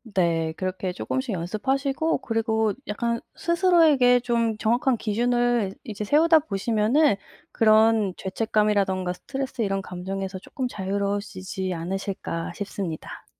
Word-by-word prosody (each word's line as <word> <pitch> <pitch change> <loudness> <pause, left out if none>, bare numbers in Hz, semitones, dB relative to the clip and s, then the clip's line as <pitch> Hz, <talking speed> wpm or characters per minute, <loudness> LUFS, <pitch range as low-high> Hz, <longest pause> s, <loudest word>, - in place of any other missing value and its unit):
네 165 -3 +1
그렇게 185 0 -3
조금씩 260 +5 -3
연습하시고 270 - -1
그리고 220 -2 0
약간 235 +2 -1 0.2
스스로에게 325 -8 +4
좀 235 -2 0
정확한 240 +4 +2
기준을 240 -1 +1
이제 210 -1 -5
세우다 320 +6 +5
보시면은 230 +2 +2 0.4
그런 220 -2 +4
죄책감이라든가 200 -2 0
스트레스 265 +6 -5
이런 195 -1 -1
감정에서 190 +1 -5
쪼끔 255 +6 -4
자유로워지지 195 -2 -3
않으실까 180 0 -4
싶습니다. 195 -5 -6
215 Hz, 325 characters per minute, -25 LUFS, 190-245 Hz, 0.4 s, 세우다